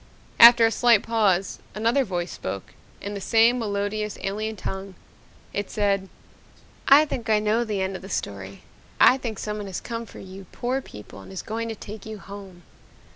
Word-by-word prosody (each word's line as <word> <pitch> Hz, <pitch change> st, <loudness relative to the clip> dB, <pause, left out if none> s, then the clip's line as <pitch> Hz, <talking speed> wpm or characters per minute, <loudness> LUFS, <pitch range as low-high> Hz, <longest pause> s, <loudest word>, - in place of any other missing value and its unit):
After 235 Hz, 0 st, +10 dB
a 225 Hz, -, +2 dB
slight 235 Hz, -3 st, +4 dB
pause 205 Hz, -5 st, +1 dB, 0.2 s
another 230 Hz, +6 st, +2 dB
voice 175 Hz, -5 st, -3 dB
spoke 95 Hz, 0 st, -6 dB, 0.3 s
in 205 Hz, -, -5 dB
the 200 Hz, -, -5 dB
same 230 Hz, +5 st, +4 dB
melodious, 210 Hz, -1 st, -2 dB
alien 215 Hz, +3 st, -3 dB
tongue! 190 Hz, 0 st, -6 dB, 0.6 s
It 205 Hz, 0 st, -3 dB
said, 200 Hz, -2 st, 0 dB, 0.8 s
"I 285 Hz, +3 st, +8 dB
think 240 Hz, -6 st, -5 dB
I 215 Hz, -, +5 dB
know 215 Hz, +3 st, +1 dB
the 210 Hz, -4 st, -2 dB
end 190 Hz, 0 st, -3 dB
of -, -, -7 dB
the 190 Hz, -, -10 dB
story. 100 Hz, -, -5 dB, 0.4 s
I 260 Hz, -, +6 dB
think 225 Hz, -5 st, -5 dB
someone 210 Hz, 0 st, -4 dB
has 190 Hz, -, -4 dB
come 230 Hz, -1 st, -6 dB
for -, -, -13 dB
you 190 Hz, 0 st, -10 dB
poor 255 Hz, +3 st, -2 dB
people 105 Hz, -, -12 dB
and -, -, -13 dB
is 190 Hz, -, -6 dB
going 230 Hz, +1 st, -4 dB
to 225 Hz, -, -4 dB
take 210 Hz, 0 st, -10 dB
you 220 Hz, 0 st, -6 dB
home." 195 Hz, -3 st, -11 dB
210 Hz, 180 wpm, -24 LUFS, 190-230 Hz, 0.8 s, After